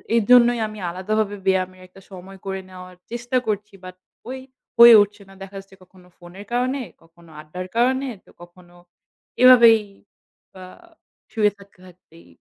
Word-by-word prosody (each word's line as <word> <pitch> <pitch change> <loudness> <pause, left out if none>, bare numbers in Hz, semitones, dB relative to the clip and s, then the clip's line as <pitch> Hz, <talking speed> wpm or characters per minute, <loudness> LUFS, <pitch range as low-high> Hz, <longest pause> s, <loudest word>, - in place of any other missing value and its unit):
এর 230 - +2
জন্যই 240 -1 +5
আমি 215 -1 -11
আলাদা 185 +5 -5
ভাবে 205 -1 -2
ব্যায়ামের 185 -1 -1
একটা 195 +2 -19
সময় 190 +1 -12
করে 190 0 -4
নেওয়ার 185 0 -13 0.2
চেষ্টা 240 +2 -3
করছি। 210 0 -4
But 185 0 -10 0.3
ওই 260 0 -6 0.4
হয়ে 235 -1 +9
উঠছে 205 0 -12
না। - - -16
দেখা 195 +1 -11
যাচ্ছে 195 0 -17
কখনো 185 0 -22
ফোনের 180 +4 -13
কারণে, 255 +2 -1 0.2
কখনো 165 0 -22
আড্ডার 180 +4 -9
কারণে 260 +3 +1 0.2
তো - - -21
কখনো 175 0 -18 0.7
এভাবেই 235 -3 +7 0.7
বা 185 -1 -13 0.7
শুয়ে 210 -3 +1
থাকতে 200 -1 -20
থাকতেই। 160 - -20
195 Hz, 155 wpm, -21 LUFS, 185-230 Hz, 0.7 s, হয়ে